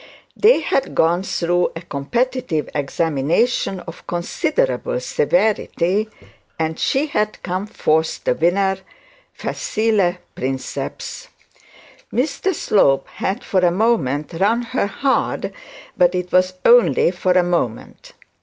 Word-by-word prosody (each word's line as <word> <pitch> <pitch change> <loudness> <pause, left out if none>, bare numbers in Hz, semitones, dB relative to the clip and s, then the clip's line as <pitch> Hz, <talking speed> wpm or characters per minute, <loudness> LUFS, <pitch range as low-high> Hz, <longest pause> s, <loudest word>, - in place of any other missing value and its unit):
They 430 -4 +5
had 275 - -1
gone 170 +2 +3
through 175 -2 0
a 165 - -6
competitive 180 - -2
examination 160 - 0
of 165 -1 -11
considerable 170 - -1
severity, 195 +6 +1 0.5
and 160 0 -2
she 270 +3 +1
had 215 -8 -2
come 185 +3 -3
forth 160 -6 0
the - - +2
winner, 190 +6 +1 0.5
facile 215 - 0 0.2
princeps. 130 +1 -5 0.8
Mr 305 - 0
Slope 140 - +2
had, 200 +6 -3
for 190 - +1
a 180 -1 +4
moment, 170 - 0
run 205 +8 +1
her 240 -2 -1
hard, 270 +6 -1 0.4
but 180 0 +3
it 180 0 -3
was 185 0 +3
only 225 - +5
for 180 0 0
a 180 0 +4
moment. 170 -10 -3
180 Hz, 115 wpm, -20 LUFS, 165-225 Hz, 0.8 s, They